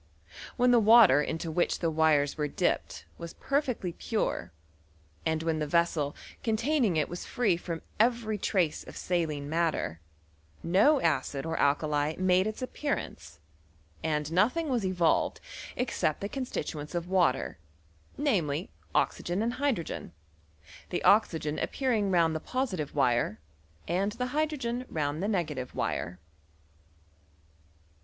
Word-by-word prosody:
When 250 0 +4
the 240 - +6
water 215 - +7
into 165 +2 -3
which 175 +2 +1
the 165 -2 0
wires 155 -2 +3
were 150 -2 -1
dipped 80 - -1
was 170 0 -7
perfectly 255 - -1
pure, 215 - -2 0.8
and 160 0 0
when 165 -1 0
the 150 - -1
vessel 160 -3 +1 0.3
containing 230 - +1
it 150 - +1
was 175 - -6
free 215 -8 +2
from 170 -1 -5 0.2
every 225 -2 +2
trace 180 -6 0
of - - -11
saline 155 -5 -1
matter, 155 - -1 0.6
no 205 - +4
acid 140 -2 0
or 165 0 -2
al 140 0 +4
kali 150 0 -1
made 185 +1 +3
its 215 +3 -4
appearance, 165 - -4 0.6
and 150 -1 -1
nothing 250 - +2
was 245 -5 0
evolved 180 -3 +1 0.4
except 240 -11 -1
the 200 - -2
constituents 175 - -4
of 170 0 -2
water, 175 - +1 0.6
namely, 180 - 0 0.2
oxygen 180 +5 0
and 235 +1 0
hydrogen; 250 - -2 0.8
the - - -2
oxygen 160 -8 +3
appearing 230 -7 0
round 165 -3 +3
the - - -1
positive 185 - -3
wire, 120 -6 +1 0.5
and 195 +5 0
the 250 +2 -2
hydrogen 275 -6 -1
round 150 0 -2
the 200 - 0
negative 155 -11 -2
wire. 90 +2 -2
175 Hz, 130 wpm, -29 LUFS, 155-225 Hz, 0.8 s, water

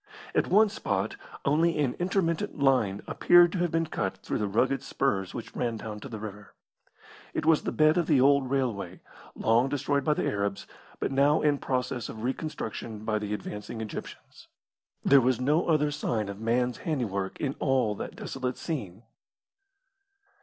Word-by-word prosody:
At - - +2
one 215 +3 +5
spot 100 - -2 0.3
only 165 +4 +3
an 140 -5 +1
intermittent 175 -2 0
line 130 -8 +2
appeared 175 -1 +5
to 185 - -2
have 175 0 +1
been 165 +1 +1
cut 95 -10 -3
through - - -3
the 105 - 0
rugged 130 +7 +1
spurs 95 -9 -1
which 120 - -7
ran 120 -2 -1
down 110 -1 -6
to 135 - -9
the 110 - -6
river. 105 -1 -9 0.8
It - - -1
was 160 -1 +5
the - - -3
bed 155 +2 +4
of 170 - 0
the 145 -5 +4
old 140 0 +4
railway, 115 -10 -2 0.3
long 120 +4 +2
destroyed 140 0 0
by 150 +2 +2
the - - -1
Arabs, 100 -1 -2 0.3
but - - -1
now 140 +3 +3
in 145 -2 +3
process 125 -2 -2
of 110 - -7
reconstruction 115 -5 -4
by 110 -1 0
the 105 -1 -5
advancing 105 +2 -5
Egyptians. 110 -2 -8 0.6
There 140 -1 +7
was 125 0 +2
no 150 +6 +2
other 150 -3 +2
sign 115 -8 -2
of 100 0 -7
man's 125 +2 0
handiwork 105 - -2
in 140 -2 -1
all 130 -6 +2
that - - -7
desolate 130 -1 -4
scene. 110 - -5
130 Hz, 170 wpm, -28 LUFS, 105-150 Hz, 0.8 s, There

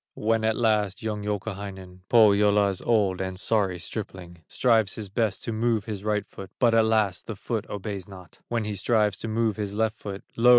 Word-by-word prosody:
When 110 +1 +1
at 110 0 +2
last 105 -2 +1
young 105 -1 -2
Youkahainen, 100 -3 -5
Pohyola's 105 -3 +4
old 100 -5 +2
and 95 -1 -4
sorry 100 -4 +1
stripling, 90 -2 -6
Strives 110 -6 +2
his 105 -3 -6
best 105 -1 -1
to 115 - -3
move 110 -1 0
his 105 -3 -5
right 105 -1 0
foot, 95 -1 -10
But 120 -3 +3
alas! 110 -4 +3
the 110 - -7
foot 110 +2 -4
obeys 100 -2 -5
not; 95 -3 -13
When 115 -2 -1
he 105 - -3
strives 105 +1 +1
to - - -5
move 110 -1 0
his 100 -1 -3
left 110 0 0
foot, 100 -1 -6
Lo! 120 +2 +4
105 Hz, 185 wpm, -26 LUFS, 95-110 Hz, -, Pohyola's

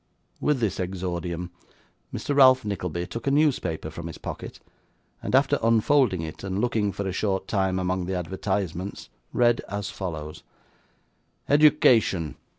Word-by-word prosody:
With 150 -3 +1
this 105 -5 0
exordium, 90 -1 -3 0.6
Mr. 145 - -3
Ralph 130 -3 +6
Nickleby 90 -4 -3
took 115 +6 -7
a - - +5
newspaper 130 - +1
from 85 +1 -7
his 80 - -8
pocket, - - -7 0.6
and - - -1
after 135 +1 +3
unfolding 115 - +3
it, 80 -1 -7
and 95 0 -2
looking 110 -3 +1
for 100 0 -4
a - - -1
short 95 -1 -1
time 95 -2 0
among 90 -1 -1
the 95 - -2
advertisements, 95 +1 -3 0.2
read 120 -1 +3
as 100 0 -4
follows: 80 -5 -6 1.1
'"EDUCATION. 130 - +4
95 Hz, 140 wpm, -25 LUFS, 90-115 Hz, 1.1 s, Ralph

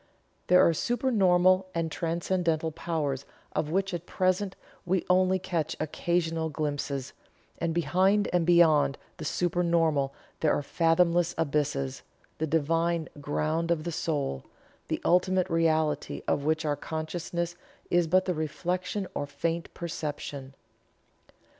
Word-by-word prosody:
There 180 0 +6
are 165 - +3
supernormal 185 - +3
and 165 -1 -1
transcendental 165 -1 -1
powers 150 -4 -2 0.3
of 150 - 0
which, 195 +3 0
at 175 0 -5
present, 185 +1 0 0.3
we 180 0 0
only 185 +1 +4
catch 170 -4 -2
occasional 165 0 -1
glimpses; 145 -3 -3 0.5
and 165 0 0
behind 185 +6 +2
and 175 -1 +3
beyond 155 -5 +4 0.2
the 155 - -6
supernormal 165 -5 +1 0.3
there 155 - +3
are 145 - -1
fathomless 170 +2 +2
abysses, 140 -3 -1 0.4
the 160 - 0
Divine 165 +2 +1
ground 155 +3 -1
of 165 -3 +1
the 170 - -3
soul; 145 - -2 0.4
the - - -1
ultimate 185 +1 +3
reality 160 -2 +1
of 140 - 0
which 160 +1 +1
our 145 -1 +1
consciousness 170 +3 -4 0.4
is 175 -1 +3
but 185 +3 +3
the 180 - 0
reflection 180 +5 -2
or 145 - -3
faint 165 +3 -3
perception. 145 -5 -5
165 Hz, 125 wpm, -28 LUFS, 155-180 Hz, 0.5 s, There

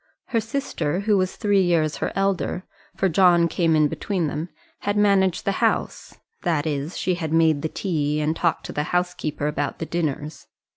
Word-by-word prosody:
Her 230 - +1
sister, 205 - -2
who 210 0 +2
was 185 -1 0
three 205 -2 +2
years 165 -4 +1
her - - -2
elder 195 -1 0 0.3
for 195 - +1
John 175 -1 +5
came 165 -1 +1
in 155 -1 +4
between 185 +3 -2
them 155 +3 -3 0.3
had 205 0 -1
managed 195 -3 +3
the 200 - +2
house; - - -1 0.2
that 160 -4 0
is, 150 +2 -3
she 185 - 0
had 165 -3 -3
made 160 -3 +3
the 160 - -2
tea 150 -6 -1
and 155 +1 0
talked 170 -1 0
to - - -5
the 150 - -1
housekeeper 175 -5 -2
about 145 -1 -2
the 165 - -4
dinners. 155 -3 -3
170 Hz, 185 wpm, -23 LUFS, 155-190 Hz, 0.3 s, John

